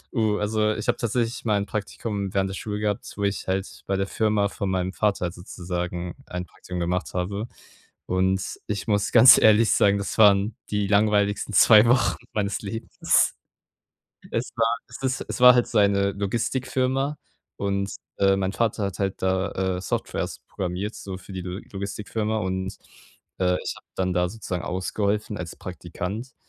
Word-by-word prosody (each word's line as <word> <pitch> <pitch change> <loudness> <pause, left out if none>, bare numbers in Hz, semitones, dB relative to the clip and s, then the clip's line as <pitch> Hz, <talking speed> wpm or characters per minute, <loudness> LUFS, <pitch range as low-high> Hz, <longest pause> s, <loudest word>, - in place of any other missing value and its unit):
Oh, 110 -3 +2
also, 110 +1 +1
ich 110 - -5
habe - - +2
tatsächlich 120 0 -1
mal 105 -3 +2
'n 100 - -1
Praktikum 100 0 -4
während 95 0 +2
der 95 - -5
Schule 105 +1 -4
gehabt, 105 -1 -2
wo 100 - -2
ich 100 0 -1
halt 95 +1 -3
bei 95 - +1
der 95 0 0
Firma 105 0 +1
von 100 0 -4
meinem 95 0 -1
Vater 100 -3 0
halt 85 - -3
sozusagen 90 -1 -5
ein 90 0 -4
Praktikum 90 0 -8
gemacht 90 +2 -2
habe. 100 +5 -2 0.6
Und 95 +1 0
ich 100 -2 -3
muss 100 -1 +1
ganz 125 +2 +9
ehrlich 110 +1 +5
sagen, 100 0 +4
das 100 -1 -4
waren 100 0 +5
die 105 -1 0
langweiligsten 105 0 +2
2 110 +2 +7
Wochen 120 +1 +3 0.2
meines 100 -2 -1
Lebens. 110 +3 +1 1.0
Es 115 - -2
war 115 0 +2
es - - -10
ist 130 -1 -1
es - - -4
war 125 0 +9
halt 120 - +3
seine 100 -2 +3
Logistikfirma 130 +7 -1 0.4
und, 100 0 -1 0.3
äh, 95 0 +4
mein 95 -1 -1
Vater 110 -1 0
hat 100 -3 -3
halt 95 -1 -2
da, 95 0 0
äh, - - -5
Softwares 90 - -3
programmiert, 95 +4 -3
so 95 -2 -7
für 95 +1 -12
die 95 - -4
Lo 90 +1 -5
Logistikfirma 105 +2 -3
und, 95 0 -3 0.6
äh, 90 -1 +2
ich - - -3
habe - - -17
dann 95 -1 0
da 90 0 +1
sozusagen 90 -4 -5
ausgeholfen 100 +3 -1
als 85 -2 -6
Praktikant. 90 +7 -6
100 Hz, 170 wpm, -25 LUFS, 95-110 Hz, 1.0 s, ganz